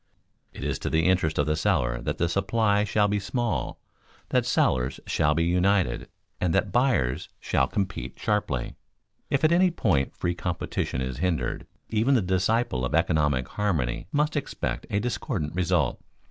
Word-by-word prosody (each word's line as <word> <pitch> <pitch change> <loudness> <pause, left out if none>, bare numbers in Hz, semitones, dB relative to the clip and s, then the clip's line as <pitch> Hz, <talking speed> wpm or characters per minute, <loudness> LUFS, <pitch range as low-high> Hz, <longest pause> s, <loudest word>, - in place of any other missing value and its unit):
It - - -9
is - - -2
to - - -3
the 80 +1 +2
interest 90 -4 +2
of 75 - +2
the 75 +1 +1
seller 75 -9 +1
that 85 +7 -1
supply 100 +3 +1
shall 105 0 +2
be 105 0 0
small, 105 - -2 0.5
that - - +1
sellers 65 +1 +1
shall 75 0 +1
be 85 - +2
united, 90 -5 +1 0.3
and 85 -3 +1
that 100 - +1
buyers 120 - +1
shall - - +1
compete 100 0 -3
sharply. 105 - -1 0.6
If 140 - 0
at 155 - +5
any 180 +2 +5
point 90 - 0
free 85 - -1
competition 85 -7 -3
is 65 -1 -3
hindered, 80 -7 -1 0.2
even 115 +5 +3
the 120 - +3
disciple 95 - +1
of 65 - 0
economic 75 -6 +2
harmony 80 -13 -1
must 150 +2 +1
expect - - -3
a 100 - +1
discordant 105 - -2
result. 90 -2 +1
90 Hz, 160 wpm, -26 LUFS, 75-105 Hz, 0.6 s, at